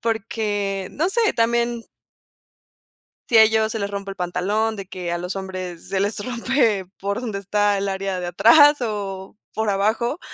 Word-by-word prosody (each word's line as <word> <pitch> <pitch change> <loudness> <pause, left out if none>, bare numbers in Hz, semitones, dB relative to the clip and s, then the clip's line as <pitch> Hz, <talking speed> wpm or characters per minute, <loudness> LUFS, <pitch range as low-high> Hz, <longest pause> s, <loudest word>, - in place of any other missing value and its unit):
porque, 205 -4 -2
no 330 +5 0
sé, 455 0 +2
también 235 0 0 1.4
si 230 - +4
a 220 - +10
ellos 220 0 +2
se 225 - -3
les 200 0 -2
rompe 200 -1 -5
el - - -9
pantalón, 200 +5 -1
de 195 -2 -7
que 180 -2 -5
a 175 - -1
los 180 +2 -5
hombres 185 -3 -6
se 195 - -1
les 205 +1 -1
rompe 235 -5 0
por 200 +4 -2
donde 215 -5 -4
está 205 +1 +1
el 195 0 -1
área 190 -1 -3
de 180 - -4
atrás 265 - +6
o 200 -3 -4 0.2
por 220 -1 -1
abajo, 220 - 0
205 Hz, 175 wpm, -22 LUFS, 195-230 Hz, 1.4 s, a